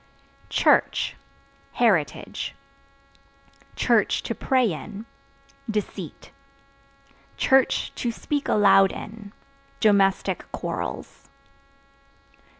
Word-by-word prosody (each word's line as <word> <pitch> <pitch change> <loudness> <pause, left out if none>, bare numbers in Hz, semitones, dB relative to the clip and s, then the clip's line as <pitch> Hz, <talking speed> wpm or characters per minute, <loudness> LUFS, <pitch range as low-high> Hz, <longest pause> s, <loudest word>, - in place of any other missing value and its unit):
Church - - +2 0.6
Heritage; 195 -11 0 1.2
(to - - +1
pray 255 -6 +1
in) 200 +7 -8 0.6
deceit; 210 -1 -5 1.1
(to 265 -2 +2
speak 285 +5 -3
aloud 195 -2 +5
in) 210 -1 -9 0.5
domestic 195 -3 +2
quarrels. - - -6
210 Hz, 55 wpm, -24 LUFS, 195-240 Hz, 1.2 s, aloud